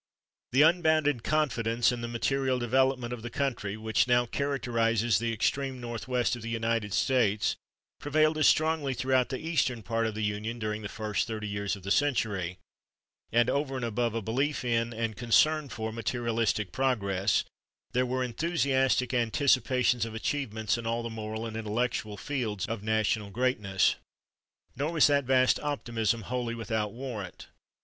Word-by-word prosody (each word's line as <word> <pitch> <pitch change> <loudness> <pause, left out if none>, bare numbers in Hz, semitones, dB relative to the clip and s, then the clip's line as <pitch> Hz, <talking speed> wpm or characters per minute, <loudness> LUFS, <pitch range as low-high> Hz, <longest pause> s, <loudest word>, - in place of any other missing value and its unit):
The 135 +4 +5
unbounded 155 -6 +3
confidence 120 -6 +1
in 120 -1 -4
the 120 - -3
material 130 +3 0
development 125 0 +1
of 120 - -6
the 120 - -6
country 115 -6 -2
which 110 +2 +1
now 120 0 +4
characterizes 115 -5 +1
the 115 0 -1
extreme 130 +4 -1
northwest 120 +1 -1
of 120 - -9
the 115 - -5
United 115 -2 -1
States 110 -2 +2 0.4
prevailed 155 +1 +2
as 155 - +5
strongly 155 -4 +2
throughout 130 0 +1
the 130 - -2
eastern 140 -8 -1
part 115 +1 0
of 110 - -4
the 110 - -3
Union 105 +3 -2
during 110 -1 -3
the 105 - -5
first 105 -6 -2
thirty 110 -2 -4
years 100 0 -2
of 100 - -13
the 100 - -4
century; 105 -10 +1 0.7
and 120 +1 +4
over 140 -1 -1
and 125 -2 -2
above 115 0 -1
a 115 - -2
belief 135 +6 -1
in, 115 -1 +1
and 115 -2 -3
concern 150 +6 +3
for, 110 -2 -4
materialistic 115 -3 -1
progress, 100 -7 +1 0.5
there 125 - +2
were 130 0 -1
enthusiastic 130 -2 +1
anticipations 125 0 +2
of 115 -1 -5
achievements 110 -3 -1
in 115 - -5
all 115 +1 -1
the 115 - -4
moral 110 0 -5
and 110 -1 -6
intellectual 110 -1 -2
fields 115 -9 -3
of 115 -2 -4
national 110 -1 0
[Pg071] - - -15
greatness." 105 -6 +1 0.8
Nor 145 +6 -2
was 160 - +5
that 140 -2 +3
vast 130 0 +3
optimism 115 -6 -1
wholly 120 0 -3
without 110 -2 -2
warrant. 115 -6 -7
120 Hz, 160 wpm, -29 LUFS, 110-130 Hz, 0.8 s, The